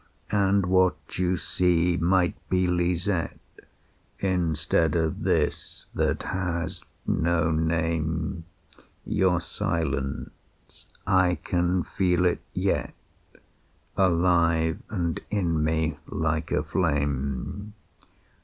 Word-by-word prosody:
"And 100 -1 +3
what 95 0 +1
you 90 0 +1
see 90 0 +2
might 90 +2 +2 0.2
be 90 0 +2
Lisette, 90 0 0 0.8
Instead 85 -4 +1
of 80 -2 0
this - - -1
that - - 0
has 85 -3 -3 0.2
no 80 0 +1
name. 80 +1 -1 0.6
Your 90 -2 +2
silence 70 -5 -4 0.2
I 95 -1 +3
can 90 0 +1
feel 90 -1 +1
it 90 - +1
yet, - - -1 1.0
Alive 85 -3 +3
and 85 -6 -1
in 85 -7 0
me, 80 -1 0
like 80 0 -1
a - - +1
flame. 70 +4 -2
85 Hz, 90 wpm, -26 LUFS, 80-90 Hz, 1.0 s, And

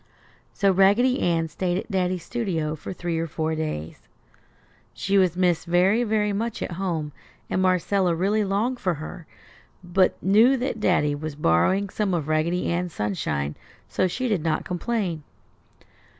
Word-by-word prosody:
So 200 -1 +2
Raggedy 205 +7 +4
Ann 165 -2 +1
stayed 175 +2 -2
at 205 - -5
Daddy's 185 -2 -1
studio 170 -10 -2
for 155 - -8
three 175 -3 -3
or 165 - -2
four 160 0 -2
days. 155 - -4 1.0
She 195 - -1
was 180 -2 +2
missed 180 -3 +1
very, 185 +7 +3
very 210 -2 +1
much 225 +2 -2
at - - -5
home 170 -4 -3 0.4
and 185 - +1
Marcella 185 -1 +2
really 200 +5 +1
longed 215 +6 -1
for 180 -3 0
her, 160 +2 -9 0.6
but 180 +1 +2
knew 220 +8 +4
that 245 -2 -3
Daddy 170 -7 +2
was 150 0 -5
borrowing 150 - +2
some 200 -2 -1
of 155 -4 -2
Raggedy 160 +3 0
Ann's 175 -1 -2
sunshine, 75 -8 -2 0.3
so 185 - +1
she 250 +8 -2
did 210 -8 0
not 160 0 -1
complain. 180 -3 -2
180 Hz, 155 wpm, -24 LUFS, 160-200 Hz, 1.0 s, Raggedy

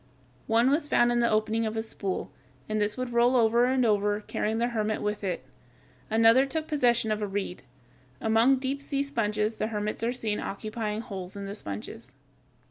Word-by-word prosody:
One 230 +4 +4
was 295 +1 +1
found 240 -4 +3
in 240 - +2
the 235 0 +3
opening 220 +1 +1
of 220 +1 -4
a 220 - 0
spool; 200 -4 -4 0.4
and 215 0 -1
this 210 +2 0
would 255 -1 -3
roll 240 +2 +4
over 235 0 +4
and 255 0 +2
over, 205 -1 +2
carrying 215 +1 -2
the 235 +1 +1
hermit 215 -2 -1
with 210 0 -2
it. 185 -2 -3 0.6
Another 225 +4 +5
took 315 +2 -3
possession 240 -6 +2
of 215 0 -1
a 210 - -1
reed. 195 -2 -4 0.6
Among 225 +4 +4
deep 265 +2 -3
sea 280 0 -1
sponges 215 -5 -1
the 215 - -1
hermits 210 -1 -3
are 230 +1 +1
seen 220 -4 -2
occupying 215 +1 -4
holes 190 -4 -7
in 200 0 -6
the 195 - -5
sponges. 115 - -8
220 Hz, 190 wpm, -28 LUFS, 210-240 Hz, 0.6 s, Another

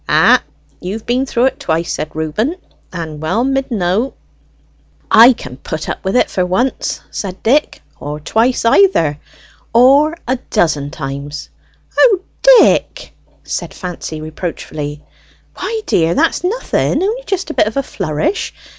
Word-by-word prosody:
"Ay, - - +5 0.4
you've 205 +5 -5
been 255 +3 0
through 240 -1 +1
it 265 - 0
twice," 165 +1 -1
said 155 - -5
Reuben, 160 - -1 0.4
"and 160 -4 -6
well 185 +10 0
mid 270 0 0
know." 215 +3 0 1.0
"I 235 +3 +9
can 125 - -7
put 155 +3 -5
up - - -4
with 190 +3 -1
it - - +4
for 185 - -1
once," 210 +9 -1
said 190 -2 -6
Dick, 285 +7 +1 0.2
"or 150 +1 -5
twice 230 - +1
either, 230 - +3 0.6
or 280 +7 +5
a 255 +1 +1
dozen 150 -8 +1
times." 145 0 -6 0.5
"O 415 -7 +4 0.2
Dick!" - - +4 0.3
said - - -5
Fancy 175 -4 -6
reproachfully. 155 -2 -6 0.5
"Why, 445 -1 -3
dear, 165 0 +2
that's 325 +2 +1
nothing, 390 -1 0
only 455 +5 -1
just 375 -4 -2
a - - -5
bit - - +2
of 220 - -4
a 275 - +1
flourish. 165 - -2
210 Hz, 145 wpm, -16 LUFS, -, 1.0 s, I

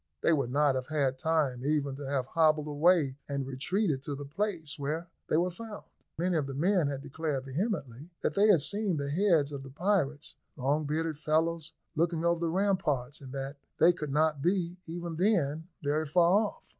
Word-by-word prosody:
They 170 - +5
would 140 -5 0
not 145 +1 +3
have 130 -1 -3
had 140 -4 0
time 150 -6 +1
even 145 -1 0
to 140 0 -7
have 135 -2 0
hobbled 155 +1 +3
away 150 -2 +3
and 140 -1 -2
retreated 140 +4 -1
to 145 +1 -4
the 145 +1 -7
place 160 -1 -3
where 155 +5 -3 0.2
they - - +3
were 180 +2 +1
found. 215 +3 -8 0.3
Many 175 +1 +1
of 145 -3 -1
the 135 - -5
men 175 +1 +2 0.2
declared 145 -2 -3
vehemently 145 - -3
that - - 0
they 205 +5 +4
had 190 -8 +6
seen 200 +2 -1
the 140 0 -2
heads 165 -4 +3
of 140 -2 -5
the 135 - -10
pirates, 150 -2 -1 0.2
long 145 +4 +1
bearded 155 +1 -2
fellows, 160 +1 0 0.2
looking 165 +1 +1
over 170 0 +2
the 170 -1 0
ramparts, 155 -8 0
and 130 -2 -9
that 135 +1 -5 0.2
they 175 +2 +6
could 150 -5 -5
not 150 0 +2
be, 175 +1 0
even 170 0 -5
then, 165 -5 +1 0.2
very 150 +2 0
far 180 +7 +4
off. - - -12
155 Hz, 190 wpm, -30 LUFS, 140-170 Hz, 0.3 s, had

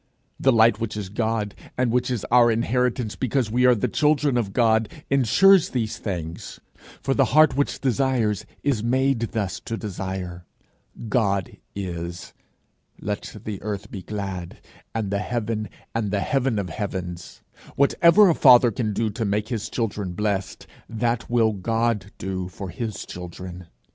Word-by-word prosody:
The 135 - +4
light 110 -2 +5
which 110 -2 -3
is 100 -3 -5
God, 110 -1 -1 0.2
and 125 -2 +1
which 125 +1 +1
is 125 -5 -2
our 120 -1 +6
inheritance 120 0 0
because 125 -3 -1
we 125 +2 +4
are 125 - +6
the 105 - 0
children 150 -3 +2
of 115 -5 0
God, 110 0 +2 0.2
insures 165 - +5
these 115 -4 -2
things. 85 -5 -5 0.4
For 135 - +1
the 135 0 +3
heart 155 -2 +6
which 145 +1 0
desires 125 -6 0 0.2
is 140 -7 +1
made 130 +1 +2
thus 100 -4 -2
to 115 - -5
desire. 95 -4 -5 0.6
God 100 -5 0 0.2
is; 85 -2 -5 0.7
let 105 +1 -4
the 105 -3 -5
earth 105 0 -5
be 100 - -6
glad, 95 -2 -5 0.4
and 105 -3 -2
the 100 - 0
heaven, 110 -1 -2 0.2
and 115 -3 -1
the 100 0 0
heaven 135 -3 0
of 100 -3 -2
heavens! 90 -2 -5 0.3
Whatever 170 +8 +5
a 170 - +5
father 125 -5 +7
can 110 -1 -2
do 110 +1 0
to 115 +3 -3
make 105 +1 -1
his 115 -4 -3
children 105 -5 -3
blessed, 100 0 -2 0.2
that 115 +1 -1
will 115 -2 +3
God 110 0 -1
do 95 -1 -4
for 95 +2 -7
his 110 -4 -5
children. 90 0 -8
110 Hz, 155 wpm, -24 LUFS, 100-125 Hz, 0.7 s, father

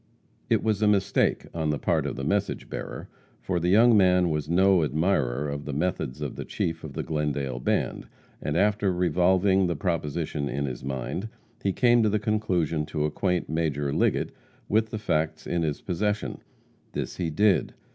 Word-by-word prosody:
It - - +2
was 110 -2 +1
a 105 - +4
mistake 100 -1 +2
on 80 -2 -1
the 75 - 0
part - - 0
of - - -4
the 70 - -5
message 100 +7 -1
bearer, - - -6 0.3
for 90 -2 -1
the 85 +1 0
young 115 +4 +6
man 90 -3 +4
was 75 -1 -2
no 95 0 +4
admirer 75 -3 0
of 70 0 -4
the 75 - -4
methods 75 -3 -2
of 75 - -4
the - - -4
chief 80 0 -3
of 75 -3 -7
the - - -3
Glendale 70 -5 -2
band, - - -1 0.3
and, 75 +2 -1
after 105 0 +2
revolving 90 +2 +3
the 85 - -1
proposition 75 -3 -2
in 70 +1 -2
his 65 -3 -5
mind, 70 - -4 0.3
he 100 - +1
came 120 +3 +4
to 110 - +3
the 105 - +1
conclusion 95 -8 0
to 75 -1 -1
acquaint 90 +3 -1
Major 75 -3 -1
Liggett - - +1 0.4
with 110 +2 +2
the 110 - -4
facts 80 -6 -1
in 85 -1 -1
his 75 -3 -2
possession. 105 +3 -2 0.5
This - - -4
he 85 -3 -1
did. 100 +4 +2
85 Hz, 180 wpm, -26 LUFS, 75-100 Hz, 0.5 s, young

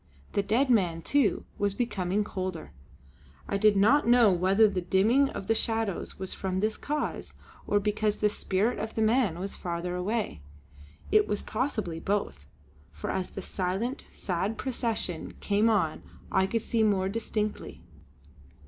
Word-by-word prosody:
The 200 - +2
dead 250 +6 +2
man, 175 -7 +2
too, 280 -7 +2
was 200 -1 0
becoming 200 -4 0
colder! 185 -5 -5 0.8
I 200 - 0
did 210 0 +4
not 230 +8 +4
know 240 -3 +6
whether 190 +5 +4
the 190 -3 -2
dimming 220 +10 +3
of 195 - -6
the 225 - +2
shadows 225 -3 -1
was 190 -1 -4
from 185 -1 -2
this 215 +2 0
cause, 300 +1 -4 0.3
or 205 - +3
because 210 +1 0
the 210 - +3
spirit 210 +2 0
of 220 +1 -5
the 220 - +1
man 220 -6 +2
was 195 +2 -4
farther 175 0 -3
away. 200 - -2 0.7
It 215 0 +5
was 205 - -2
possibly 215 - -2
both, 195 - -2 0.4
for 75 0 -5
as 185 -1 -2
the 195 - -7
silent, 195 +8 -3
sad 190 +4 -2
procession 230 -9 -3
came 210 +2 +2
on 180 -8 +1 0.3
I 190 0 +3
could 225 +2 -1
see 230 - 0
more 200 -3 +2
distinctly. 215 0 -3
205 Hz, 155 wpm, -28 LUFS, 185-225 Hz, 0.8 s, know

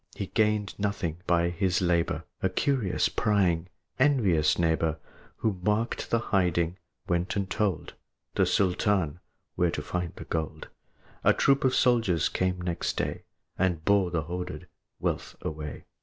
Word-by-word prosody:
But - - -18
he 100 - -2
gained 105 -2 +1
nothing 100 -5 -2
by 85 0 +3
his 90 +1 +1
labor: 85 -2 +1 0.2
A 95 - +2
curious, 120 0 +1
prying, 95 -5 +1 0.3
envious 105 - +3
neighbor, 80 -2 +1 0.4
Who 105 -5 -1
marked 105 +5 0
the 115 - +3
hiding, 90 -5 +1 0.3
went 85 +1 0
and 100 -2 -1
told 100 -5 -1 0.4
The - - +2
Sultan 90 -3 +1 0.3
where 90 - +2
to 75 - -3
find 90 +1 -3
the - - -9
gold. 80 -2 -4 0.5
A - - +6
troop 140 0 +3
of 130 -1 +3
soldiers 115 - +3
came 90 0 0
next 90 -1 -2
day, - - -2 0.3
And 85 -4 +1
bore 100 -3 +4
the 85 -3 -1
hoarded 90 +3 -5 0.3
wealth - - -2
away. 75 -1 -5
90 Hz, 145 wpm, -28 LUFS, 85-105 Hz, 0.5 s, A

